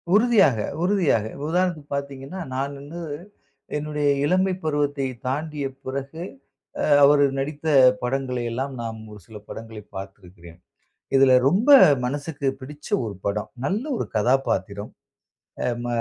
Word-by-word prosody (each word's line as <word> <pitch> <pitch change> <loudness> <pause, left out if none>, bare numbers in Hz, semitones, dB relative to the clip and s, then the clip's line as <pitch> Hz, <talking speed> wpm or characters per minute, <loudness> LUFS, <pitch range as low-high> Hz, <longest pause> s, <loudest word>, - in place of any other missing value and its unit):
உறுதியாக, 210 - +4 0.3
உறுதியாக. 175 - +2 0.2
உதாரணத்துக்கு 170 -4 -1
பார்த்தீங்கன்னா, 140 +5 -6 0.2
நான் 140 +2 -2
வந்து 145 +5 -9 0.8
என்னுடைய 150 -1 -1 0.2
இளமை 185 +4 +2
பருவத்தை 145 -2 0 0.2
தாண்டிய 150 +2 -2 0.2
பிறகு 140 +4 -5 0.6
அ - - 0 0.2
அவர் 145 0 +6 0.2
நடித்த 145 +3 -5 0.4
படங்களை 125 0 -1
எல்லாம், 135 +4 -3
நாம் 115 -1 -5
ஒரு 105 - -11
சில 110 - -10
படங்களை 110 -1 -8
பார்த்திருக்கிறேன். 90 -3 -11 0.6
இதுல 135 -1 +6
ரொம்ப 200 - +2 0.4
மனசுக்கு 145 +2 -3
பிடிச்ச 145 +3 -10 0.2
ஒரு 105 -2 -5
படம். 100 +1 -2 0.2
நல்ல 200 - -1
ஒரு - - -2
கதாபாத்திரம். 110 -3 0 0.7
அ - - +1 0.2
ம - - -2
140 Hz, 120 wpm, -23 LUFS, 120-150 Hz, 0.8 s, அவர்